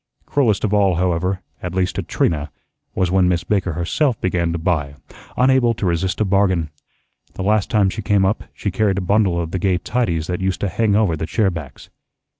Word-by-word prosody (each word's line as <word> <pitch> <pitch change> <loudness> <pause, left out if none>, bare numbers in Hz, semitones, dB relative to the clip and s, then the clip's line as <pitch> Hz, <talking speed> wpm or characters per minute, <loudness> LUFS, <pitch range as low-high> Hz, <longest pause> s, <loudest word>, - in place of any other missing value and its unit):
Cruelest 120 -8 +1
of 105 -1 0
all, 100 -3 +3
however, 90 +2 0 0.2
at 90 0 -5
least 95 -1 0
to - - -2
Trina, 75 -2 -1 0.5
was 90 -2 +1
when 95 -1 +3
Miss 85 -1 0
Baker 95 -4 0
herself 110 - 0
began 90 -2 0
to 85 - -2
buy, 80 -5 -1 0.4
unable 125 -2 +3
to 105 - -3
resist 90 +3 -1
a 110 - +2
bargain. 95 -5 +1 0.6
The 95 - -4
last 105 0 +1
time 100 -3 +2
she 110 - -5
came 100 -1 +2
up 100 +3 -1
she 100 - -4
carried 100 0 +1
a - - 0
bundle 100 -3 +2
of 80 -1 -3
the 95 - -2
gay 95 -1 +1
tidies 90 -7 -1
that 90 +1 -3
used 95 -1 -1
to 100 - 0
hang 105 +2 +1
over 105 -6 +2
the 80 0 -4
chair 105 -2 +1
backs. 80 -6 -9
95 Hz, 210 wpm, -20 LUFS, 85-105 Hz, 0.6 s, all